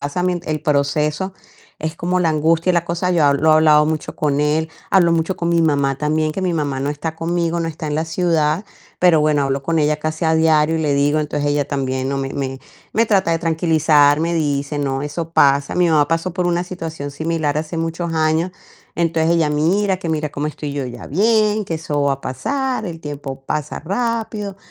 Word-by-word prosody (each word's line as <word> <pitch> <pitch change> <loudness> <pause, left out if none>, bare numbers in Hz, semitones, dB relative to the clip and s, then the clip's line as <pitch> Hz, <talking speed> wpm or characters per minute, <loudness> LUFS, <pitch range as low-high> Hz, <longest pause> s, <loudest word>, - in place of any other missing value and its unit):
pasa 145 +6 -2
mien 180 -1 0
el 155 -1 -2
proceso 150 +5 0 0.5
es 155 +2 -4
como 180 +1 0
la 170 - +2
angustia 160 +3 +2
y - - +3
la 170 0 +1
cosa, 170 +2 -1
yo 165 -4 +3
habl 140 0 +3
lo 160 - +5
he - - +6
hablado 150 -1 +5
mucho 155 0 -3
con 145 -1 0
él, 155 +2 +1 0.2
hablo 175 -3 +4
mucho 165 +3 0
con 170 - -2
mi 170 -1 +3
mamá 140 -3 +1
también, 155 +1 0
que 190 - -4
mi 180 -2 0
mamá 145 -4 -1
no 140 +1 -1
está 155 +2 -4
conmigo, 170 0 -1
no 165 - -1
está 155 0 -6
en 150 - -2
la 160 - 0
ciudad, 165 0 0 0.4
pero 175 -4 +5
bueno, 150 -1 +2
hablo 135 0 -1
con 165 +1 0
ella 150 0 +1
casi 155 +2 -3
a 160 0 +3
diario 160 0 +3
y - - -1
le 145 -2 +1
digo, 145 +2 +2
entonces 145 -1 -2
ella 145 -1 0
también, 130 -2 -2
¿no?, 140 0 -1
me 135 0 -3
me 135 -1 -3 0.3
me 225 +1 +2
trata 190 -5 +2
de 165 - +1
tranquilizar, 155 -3 +3
me 170 +1 0
dice: 145 -2 -1
"No, 135 -1 -1
eso 160 +3 -4
pasa", 140 -1 +3
mi 180 -1 +3
mamá 150 -2 +3
pasó 165 +2 -1
por 180 -2 0
una 175 +1 0
situación 165 -5 -6
similar 155 -1 -1
hace 155 +2 -4
muchos 165 +1 -3
años, 160 +3 +1 0.4
entonces 165 -1 +1
ella: 160 -3 +2
"Mira 185 +6 +1
que 175 -2 -6
mira 155 -2 -1
cómo 145 +1 -3
estoy 150 -1 -5
yo 140 -2 -3
ya 120 -1 -8
bien, 215 +4 +2
que 165 - -3
eso 150 -2 -2
va 140 -1 +2
a 135 - -15
pasar, 255 - -2
el 165 -2 -7
tiempo 140 -3 -7
pasa 150 0 -3
rápido, 210 +1 -3
155 Hz, 220 wpm, -19 LUFS, 145-170 Hz, 0.5 s, he